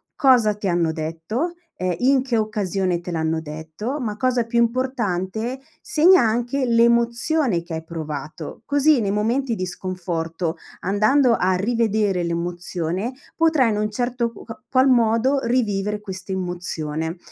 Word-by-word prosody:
cosa 245 -7 +4
ti 205 -1 -4
hanno 170 -2 +1
detto, 165 - -3 0.2
ehm, 180 -1 -1
in 265 +1 +3
che 245 -4 0
occasione 195 -4 0
te 175 0 -7
l'hanno 160 0 -1
detto, 160 - -5
ma 215 -4 -3
cosa 250 -2 +1
più 235 +1 0
importante, 235 -2 -1 0.2
segna 345 +2 +5
anche 240 +4 0
l'emozione 235 - +2
che 170 -1 -6
hai 160 - -5
provato. 155 -1 -6
Così 285 -1 +3
nei 200 -2 0
momenti 235 +5 0
di 185 -3 -3
sconforto, 170 -2 -3 0.2
andando 220 +7 +3
a 185 +1 +2
rivedere 210 -3 +1
l'emozione, 175 +4 -3 0.2
potrai 315 -7 +3
in 210 - 0
un 210 0 -1
certo 240 +1 -1
q 230 - -12
ca 225 - -10
qual 260 0 +4
modo 240 +3 +3
rivivere 210 -4 0
questa 190 -2 -7
emozione. 175 -3 -3
210 Hz, 140 wpm, -22 LUFS, 175-245 Hz, 0.2 s, segna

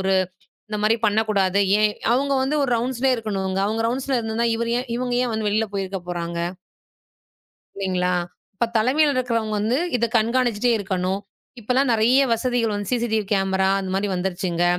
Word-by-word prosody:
ஒரு 190 0 +1 0.6
இந்த 210 - -2
மாரி 220 +2 +4
பண்ணக்கூடாது. 205 -2 +2 0.2
ஏன்? 215 0 +3 0.2
அவுங்க 275 +2 +1
வந்து 280 +3 0
ஒரு 265 - -2
ரவுண்ட்ஸ்லயே 255 +2 +1
இருக்கணும்ங்க. 195 -4 -2
அவுங்க 220 +2 -1
ரவுண்ட்ஸ்ல 260 +1 -1
இருந்தா, 225 +1 -1
இவரு 235 0 -1
ஏ - - -1
இவங்க 245 0 -2
ஏன் 245 -2 -1
வந்து 220 -1 -1
வெளியில 220 +2 +1
போயிருக்க 195 -1 -3
போறாங்க? 170 -1 -3 1.4
இல்லிங்கலா 180 -2 0 0.4
?அப்போ 235 +4 0
தலைமைல 280 +7 +3
இருக்கவங்க 230 -4 -1
வந்து 220 +4 +1 0.2
இத 235 0 +1
கண்கானுச்சிட்டே 235 0 +2
இருக்கணும். 190 -1 -2 0.4
இப்ப 215 - -12
எல்லாம் 265 +1 +2
நிறைய 230 +4 +4
வசதிகள் 230 -1 0
வன் 205 0 -3
சிசிடிவி 230 -3 0
கேமரா 190 -1 +2
அந்த 190 -1 -4
மாரி 200 +2 0
வந்துருச்சுங்க. 180 -1 -1
220 Hz, 160 wpm, -22 LUFS, 195-245 Hz, 1.4 s, மாரி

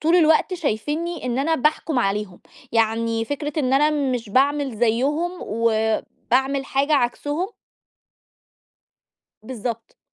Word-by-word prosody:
طول 330 +3 +3
الوقت 320 +2 +4
شايفينّي 310 +2 -2
إن 245 0 -1
أنا 320 +4 +2
باحكُم 305 0 +1
عليهم. 200 -4 -1 0.3
يعني 225 0 +1
فكرة 290 +4 -4
إن 260 -3 +1
أنا 295 +3 +4
مش 260 -6 -1
باعمل 275 +2 +1
زيّهم 265 +10 +1
وباعمل 230 +4 0
حاجة 280 +2 +1
عكسهم 290 +6 0 2.0
بالضبط، 230 -1 -6
265 Hz, 105 wpm, -22 LUFS, 230-300 Hz, 2.0 s, الوقت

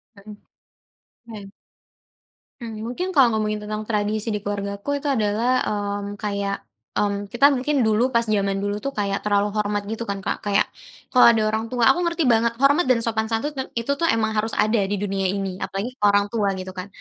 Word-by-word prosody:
Mhm. 205 +1 -12 1.0
Iya. 200 -2 -9 1.1
Mmm, 225 -1 -6
mungkin 360 +10 -3
kalo 255 -8 +4
ngomongin 215 0 -1
tentang 215 0 -3
tradisi 215 +1 -1
di 210 - -1
keluargaku 200 +2 -4
itu - - -2
adalah, 230 +2 +1
mmm, 205 0 -3
kayak, 200 -1 -3 0.3
mmm, 205 0 -1
kita 240 +7 +4
mungkin 270 0 +1
dulu 230 +4 +1
pas 235 - +4
jaman 200 -3 0
dulu 205 0 -2
tuh 275 +5 -5
kayak 200 -1 -1
terlalu 205 0 +2
hormat 205 -1 -1
gitu 225 +1 -4
kan, 200 -1 -4
Kak. - - -2
Kayak 205 -1 +2 0.5
kalau 250 - +6
ada 220 - +1
orang 220 +1 -2
tua 240 0 -1
aku 350 - -1
ngerti 340 -1 0
banget 230 -2 +3
hormat 275 +5 +3
dan 235 -3 +3
sopan 220 -1 -1
santun 225 +7 -1
tem 270 -2 -4
itu 235 +4 -1
tuh 335 - +2
emang 225 -5 +1
harus 220 +1 -1
ada 215 +2 +2
di 205 - -1
dunia 195 -1 -1
ini 190 -1 -3
apalagi 200 +6 -4
ke - - -8
orang 205 0 +4
tua 205 -4 0
gitu 185 0 -6
kan, 185 +1 -7
215 Hz, 195 wpm, -23 LUFS, 205-235 Hz, 1.1 s, kalau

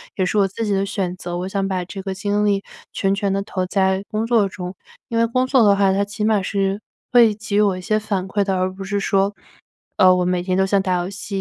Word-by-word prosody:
也 190 - 0
是 205 +3 -1
我 195 - +4
自 220 +4 -4
己 205 - -1
的 195 0 +1
选 195 -3 -2
择， 175 -1 -5
我 180 - -3
想 195 0 -1
把 185 -2 -2
这 190 +2 -7
个 190 -1 -4
精 205 +2 0
力 200 -1 +1 0.3
全 195 0 +1
权 200 -1 -1
地 195 - 0
投 185 -2 -3
在 190 +1 0
工 215 +1 -1
作 230 -4 +3
中。 180 -1 -7 0.4
因 230 - -2
为 230 0 +3
工 255 +2 +1
作 260 -2 +3
的 200 -1 +5
话， 195 -1 +3
它 200 +1 +1
起 205 +1 -5
码 215 -2 +2
是 195 +1 -1 0.3
会 230 -4 +5
给 210 -1 -3
予 - - +5
我 195 -3 +2
一 - - -7
些 215 +4 0
反 200 -3 -2
馈 205 0 +1
的 190 -1 0
而 185 0 0
不 195 +1 -8
是 205 +1 -2
说， 200 0 +1 0.6
呃， 185 -1 +6
我 180 - +1
每 180 0 0
天 185 +1 -1
都 190 - +3
像 195 0 +2
打 185 -1 -1
游 180 - -4
戏 200 -1 -5
195 Hz, 290 characters per minute, -21 LUFS, 190-210 Hz, 0.6 s, 呃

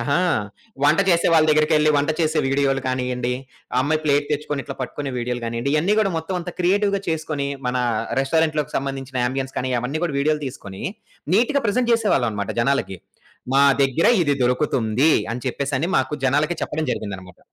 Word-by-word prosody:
ఆహా! 140 +3 +1 0.6
వంట 150 +5 +4
చేసే 170 -1 +3
వాళ్ళ 160 -1 +5
దగ్గరికెళ్లి 155 0 +4
వంట 145 +2 +1
చేసే 155 0 +1
వీడియోలు 135 0 +1
కానియ్యండి, 125 -1 -1 0.4
ఆ - - +4
అమ్మాయి 155 +3 +1
ప్లేట్ 145 0 +2
తెచ్చుకొని 145 -1 -2
ఇట్లా - - -6
పట్టుకునే 140 +2 -4
వీడియోలు 125 0 -2
కానియ్యండి, 115 +4 -2
ఇయన్నీ 175 +8 +2
కూడా 205 -3 +2
మొత్తం 160 +4 -3
అంతా 175 0 -6
క్రియేటివ్‌గా 200 +2 +2
చేసుకొని 155 -3 -2 0.2
మన 125 - 0 0.4
రెస్టారెంట్‌లోకి 155 +1 0
సంబంధించిన 135 -1 -4
యాంబియన్స్ 130 +1 -2
కానీ 130 0 -1
అవన్నీ 135 +6 -3
కూడా 150 - -2
వీడియోలు 150 +1 +1
తీసుకొని 100 -7 -8 0.5
నీట్‌గా 270 +6 +2
ప్రజెంట్ 240 +4 +1
జేసేవాళ్ళం 205 - +2
అన్నమాట 100 -1 -3
జనాలకి. 120 -7 0 0.6
మా 140 - +5 0.2
దగ్గర 135 +4 +2 0.2
ఇది 145 -2 +1
దొరుకుతుంది 125 +1 +2 0.2
అని 120 - -3
చెప్పేసని 140 +4 -1
మాకు 150 - 0
జనాలకి 150 +6 +2
చెప్పడం 155 +1 -2
జరిగిందన్నమాట. 95 -4 -6
140 Hz, 160 wpm, -22 LUFS, 130-160 Hz, 0.6 s, వాళ్ళ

